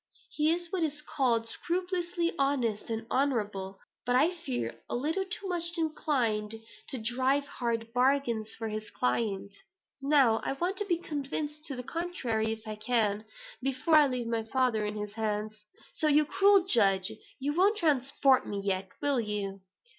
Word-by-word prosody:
He 305 0 +2
is 345 0 0
what 375 -3 -1
is 300 -2 -1
called 240 -6 +1
scrupulously 350 +3 -1
honest 250 -6 0
and 225 0 -3
honorable; 210 -8 0 0.3
but 245 0 +1
I 300 +7 +4
fear 120 - -4
a - - -1
little 320 +10 0
too 385 +1 -4
much 340 -1 -2
inclined 245 -9 0 0.3
to 270 - -2
drive 260 +5 +1
hard 230 -4 -3
bargains 245 -4 +2
for 225 -1 -3
his 215 0 -4
client. 200 - -1 0.5
Now 275 -6 +4
I - - -1
want 355 +7 -2
to 415 - -1
be 350 -4 +1
convinced 300 -1 -4
to 280 - -4
the 250 - -5
contrary, 245 -10 -2
if 220 0 -6
I 215 0 -5
can, 215 -2 +1 0.4
before 270 +5 +2
I 300 -2 +7
leave 250 -2 -2
my 230 -1 -1
father 225 -1 +1
in 210 - -4
his 210 0 -5
hands. 215 -1 -3 0.3
So 310 - 0
you 300 0 +5
cruel 395 +3 +4
judge, 195 - +3 0.3
you 285 +2 -1
won't 395 +6 +3
transport 275 - +3
me 200 - -3
yet, 190 -1 -1
will 285 -3 +4
you?" 205 -3 -3
255 Hz, 165 wpm, -30 LUFS, 220-305 Hz, 0.5 s, I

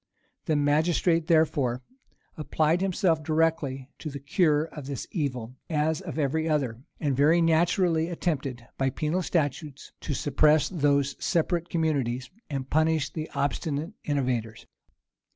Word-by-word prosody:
[*] - - -46
The 155 - +1
magistrate, 160 +3 +2
therefore, 140 -6 +2 0.5
applied 155 +2 +1
himself 180 -4 +1
directly 155 -4 0
to 155 - -5
the 140 - -6
cure 150 +2 +2
of 150 -4 -9
this 140 -3 -4
evil, 130 - -3
as 155 0 0
of 135 - -7
every 160 +2 0
other; 130 -6 -1 0.2
and 145 -4 0
very 150 +6 +4
naturally 165 0 +2
attempted, 140 -8 -3
by 135 0 +2
penal 155 +7 -1
statutes, 150 -4 -2
to 145 - -3
suppress 150 +2 +3
those 140 -5 +1
separate 170 0 0
communities, 135 -7 -1 0.2
and 135 -3 -3
punish 155 0 +1
the 155 -1 -4
obstinate 145 +4 -2
innovators. 125 -6 -2
150 Hz, 135 wpm, -27 LUFS, 140-165 Hz, 0.5 s, very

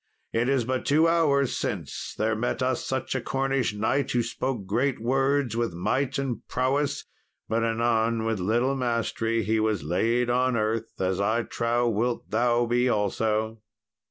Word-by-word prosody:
It 115 +3 +1
is 135 -4 +2
but 130 +1 -1
two 155 +3 +4
hours 145 -5 +2
since - - -4
there 110 +1 +1
met 120 +3 -1
us 130 -1 0
such 130 0 -2
a 130 - -1
Cornish 135 -4 0
knight, 130 +6 0
who 120 -1 +1
spoke 120 -2 -3
great 130 +6 0
words 135 +1 +1
with 115 -7 -1
might 130 +10 0
and 135 -3 -2
prowess, 140 +3 0 0.4
but 115 +1 0
anon, 115 0 +1
with 115 -3 -1
little 120 +8 +1
mastery, 115 -2 -1
he 110 +1 +1
was 110 -6 0
laid 115 +10 +1
on 125 0 +2
earth, 110 +1 -2
as 95 0 0
I 110 +4 +1
trow 120 +1 0
wilt 115 +2 -1
thou 120 +2 +2
be 120 +2 +2
also." 110 +1 0
120 Hz, 160 wpm, -26 LUFS, 110-130 Hz, 0.4 s, two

